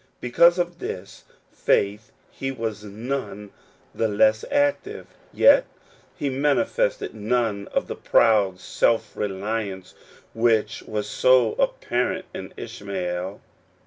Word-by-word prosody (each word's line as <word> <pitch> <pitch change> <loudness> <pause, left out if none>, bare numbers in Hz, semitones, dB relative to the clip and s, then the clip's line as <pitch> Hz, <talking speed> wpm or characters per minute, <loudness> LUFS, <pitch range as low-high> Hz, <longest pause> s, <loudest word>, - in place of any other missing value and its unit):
Because 170 +8 +4
of 175 -1 -2
this 95 +1 -7 0.3
faith 105 +2 0 0.2
he 135 - -4
was 110 -5 -4
none 105 -1 -5 0.4
the 115 - 0
less 110 +1 +3
active; 285 +9 0 0.3
yet - - +6 0.5
he 145 - -2
manifested 280 - 0
none 110 -1 -1
of - - -1
the - - -6
proud 100 -5 +3
self 115 +3 0
reliance 100 -1 -4 0.4
which 110 -2 +1
was 105 -1 -3
so 125 0 +4
appar - - 0
ent - - -8
in - - -7
Ishmael. 95 -1 -5
110 Hz, 115 wpm, -24 LUFS, 100-135 Hz, 0.5 s, yet